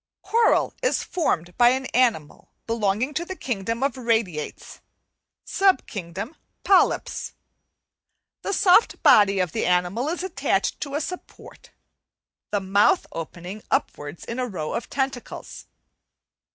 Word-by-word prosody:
"Coral 465 Hz, 0 st, +2 dB
is -, -, +1 dB
formed 175 Hz, -, -1 dB
by 240 Hz, 0 st, +7 dB
an 260 Hz, +1 st, 0 dB
animal 225 Hz, -12 st, 0 dB, 0.2 s
belonging 225 Hz, +4 st, 0 dB
to 325 Hz, -, -1 dB
the 375 Hz, +2 st, -6 dB
kingdom 230 Hz, -, -3 dB
of 275 Hz, -, 0 dB
Radiates, 225 Hz, -11 st, -2 dB, 0.6 s
sub 390 Hz, -1 st, +2 dB
kingdom 200 Hz, -, -6 dB, 0.3 s
Polypes. 390 Hz, -2 st, +2 dB, 1.1 s
The -, -, -3 dB
soft 390 Hz, +2 st, +4 dB
body 200 Hz, -2 st, +6 dB
of 180 Hz, -3 st, 0 dB
the -, -, -1 dB
animal 180 Hz, +9 st, +1 dB
is 350 Hz, +2 st, -3 dB
attached 375 Hz, -2 st, -1 dB
to 280 Hz, -1 st, -4 dB
a 295 Hz, -, 0 dB
support, 365 Hz, +4 st, -9 dB, 0.8 s
the 205 Hz, -, 0 dB
mouth 200 Hz, -, +3 dB
opening 175 Hz, +5 st, -7 dB
upwards 145 Hz, +3 st, -2 dB
in 230 Hz, +2 st, -5 dB
a 250 Hz, -, -1 dB
row 160 Hz, -8 st, -4 dB
of 230 Hz, -, -4 dB
tentacles. 265 Hz, -3 st, -4 dB
230 Hz, 125 wpm, -24 LUFS, 190-290 Hz, 1.1 s, by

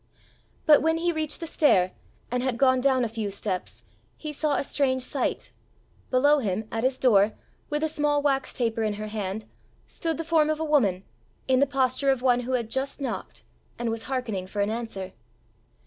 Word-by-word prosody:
But 300 Hz, -1 st, +7 dB
when 320 Hz, +1 st, +2 dB
he 345 Hz, +1 st, +1 dB
reached 310 Hz, -1 st, -3 dB
the -, -, -3 dB
stair, 195 Hz, -, +3 dB, 0.4 s
and 250 Hz, 0 st, 0 dB
had 255 Hz, -2 st, -1 dB
gone 260 Hz, 0 st, +4 dB
down 260 Hz, -2 st, +3 dB
a -, -, 0 dB
few 220 Hz, -2 st, -3 dB
steps, 195 Hz, -2 st, -4 dB, 0.3 s
he 305 Hz, -1 st, -6 dB
saw 295 Hz, 0 st, 0 dB
a -, -, 0 dB
strange 260 Hz, -2 st, 0 dB
sight: 270 Hz, 0 st, -2 dB, 0.6 s
below 285 Hz, +3 st, +4 dB
him, 215 Hz, -2 st, -2 dB
at 225 Hz, 0 st, -2 dB
his 260 Hz, 0 st, +1 dB
door, 215 Hz, -5 st, +4 dB, 0.4 s
with 295 Hz, 0 st, -1 dB
a -, -, +3 dB
small 295 Hz, -1 st, +1 dB
wax 270 Hz, -2 st, +1 dB
taper 230 Hz, -2 st, -1 dB
in 215 Hz, -1 st, 0 dB
her 215 Hz, +1 st, -5 dB
hand, 210 Hz, 0 st, -4 dB, 0.4 s
stood 325 Hz, -1 st, -3 dB
the 330 Hz, -, -4 dB
form 315 Hz, -2 st, +3 dB
of 310 Hz, 0 st, 0 dB
a 320 Hz, -, -1 dB
woman, 210 Hz, -, +2 dB, 0.4 s
in 260 Hz, -1 st, +4 dB
the 280 Hz, -, +4 dB
posture 270 Hz, 0 st, +1 dB
of 265 Hz, -2 st, +1 dB
one 245 Hz, -2 st, +4 dB
who 250 Hz, +1 st, -3 dB
had 235 Hz, -3 st, -1 dB
just 270 Hz, +3 st, -2 dB
knocked, 275 Hz, -, -5 dB, 0.3 s
and 235 Hz, -1 st, -1 dB
was 225 Hz, 0 st, -5 dB
hearkening 225 Hz, -8 st, -2 dB
for 205 Hz, -, -6 dB
an 200 Hz, +1 st, +1 dB
answer. 220 Hz, -5 st, -5 dB
255 Hz, 195 wpm, -26 LUFS, 220-290 Hz, 0.6 s, But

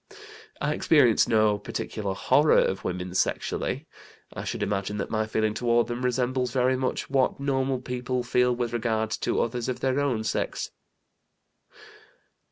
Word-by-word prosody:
"I 150 Hz, -, 0 dB
experience 135 Hz, -8 st, +4 dB
no 110 Hz, -2 st, +3 dB
particular 100 Hz, -1 st, -4 dB
'horror' 150 Hz, +9 st, +4 dB
of 95 Hz, -, +1 dB
women 90 Hz, 0 st, -4 dB
sexually. -, -, -1 dB, 0.5 s
I -, -, -6 dB
should -, -, -3 dB
imagine 100 Hz, +1 st, -2 dB
that 100 Hz, -, -4 dB
my 110 Hz, -1 st, 0 dB
feeling 110 Hz, -1 st, 0 dB
toward 120 Hz, 0 st, +2 dB
them 120 Hz, +2 st, -4 dB
resembles 125 Hz, 0 st, 0 dB
very 130 Hz, +1 st, +2 dB
much 130 Hz, 0 st, -2 dB
what 135 Hz, -1 st, +1 dB
normal 135 Hz, -1 st, 0 dB
people 125 Hz, 0 st, -3 dB
feel 125 Hz, 0 st, +2 dB
with 120 Hz, -1 st, -2 dB
regard 110 Hz, -2 st, -1 dB
to -, -, 0 dB
others 120 Hz, +1 st, -2 dB
of 125 Hz, -, -3 dB
their 135 Hz, +1 st, +1 dB
own 130 Hz, -6 st, 0 dB
sex." -, -, -2 dB
120 Hz, 150 wpm, -26 LUFS, 110-130 Hz, 0.5 s, experience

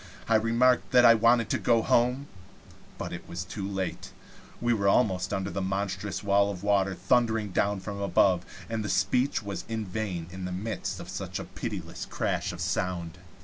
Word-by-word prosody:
I 115 Hz, -, +2 dB
remarked 115 Hz, +3 st, +3 dB
that 125 Hz, -1 st, +7 dB
I 115 Hz, -, +9 dB
wanted 115 Hz, 0 st, +4 dB
to -, -, +1 dB
go 115 Hz, -2 st, +3 dB
home; 125 Hz, +4 st, +2 dB, 0.7 s
but -, -, -5 dB
it -, -, -8 dB
was 85 Hz, +2 st, -4 dB
too 95 Hz, +1 st, -5 dB
late. 95 Hz, -2 st, -4 dB, 0.5 s
We 120 Hz, 0 st, +2 dB
were 100 Hz, -3 st, 0 dB
almost 95 Hz, -3 st, +2 dB
under 95 Hz, 0 st, -2 dB
the 100 Hz, -, -3 dB
monstrous 95 Hz, +1 st, -3 dB
wall 100 Hz, 0 st, +3 dB
of 100 Hz, -2 st, -6 dB
water 100 Hz, -2 st, +2 dB
thundering 110 Hz, +1 st, +1 dB
down 100 Hz, +1 st, 0 dB
from 100 Hz, +1 st, -6 dB
above, 90 Hz, -2 st, +3 dB, 0.2 s
and 110 Hz, -2 st, -3 dB
speech 130 Hz, -1 st, +1 dB
was 100 Hz, -1 st, -5 dB
in 110 Hz, -1 st, -2 dB
vain 95 Hz, -3 st, -3 dB
in 95 Hz, 0 st, -6 dB
the 90 Hz, -, -4 dB
midst 105 Hz, +5 st, -4 dB
of -, -, -8 dB
such -, -, -5 dB
a -, -, -4 dB
pitiless -, -, -6 dB
crash -, -, -1 dB
of 90 Hz, 0 st, -7 dB
sound. 90 Hz, -1 st, -2 dB
100 Hz, 185 wpm, -28 LUFS, 95-115 Hz, 0.7 s, I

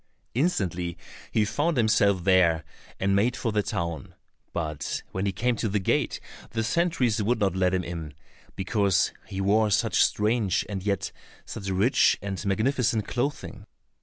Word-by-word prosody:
Instantly 90 Hz, -, -1 dB, 0.3 s
he 110 Hz, -, +2 dB
found 145 Hz, +9 st, 0 dB
himself 105 Hz, -5 st, +3 dB
there, 85 Hz, -4 st, +4 dB, 0.4 s
and 95 Hz, +1 st, +2 dB
made 115 Hz, +5 st, +2 dB
for 115 Hz, -, -1 dB
the 105 Hz, 0 st, +2 dB
town, 85 Hz, -4 st, -4 dB, 0.4 s
but 75 Hz, -3 st, -3 dB
when 95 Hz, +2 st, -2 dB
he -, -, +1 dB
came 120 Hz, +5 st, 0 dB
to 110 Hz, -, -1 dB
the 105 Hz, -, 0 dB
gate, 95 Hz, -, 0 dB, 0.3 s
the 115 Hz, 0 st, -2 dB
sentries 125 Hz, -6 st, +1 dB
would 120 Hz, +4 st, +1 dB
not 100 Hz, -3 st, +1 dB
let 90 Hz, -1 st, +2 dB
him 90 Hz, -, -1 dB
in, 80 Hz, -4 st, -6 dB, 0.4 s
because 100 Hz, -1 st, +1 dB
he 95 Hz, -, -5 dB
wore 105 Hz, +3 st, +3 dB
such 100 Hz, -, +3 dB
strange 105 Hz, -3 st, +1 dB
and 100 Hz, -2 st, -4 dB
yet 100 Hz, -1 st, -1 dB, 0.3 s
such 95 Hz, -, -6 dB
rich 100 Hz, +7 st, +3 dB
and 100 Hz, -1 st, -5 dB
magnificent 110 Hz, +1 st, +1 dB
clothing. 140 Hz, +4 st, -3 dB
100 Hz, 155 wpm, -26 LUFS, 95-115 Hz, 0.4 s, there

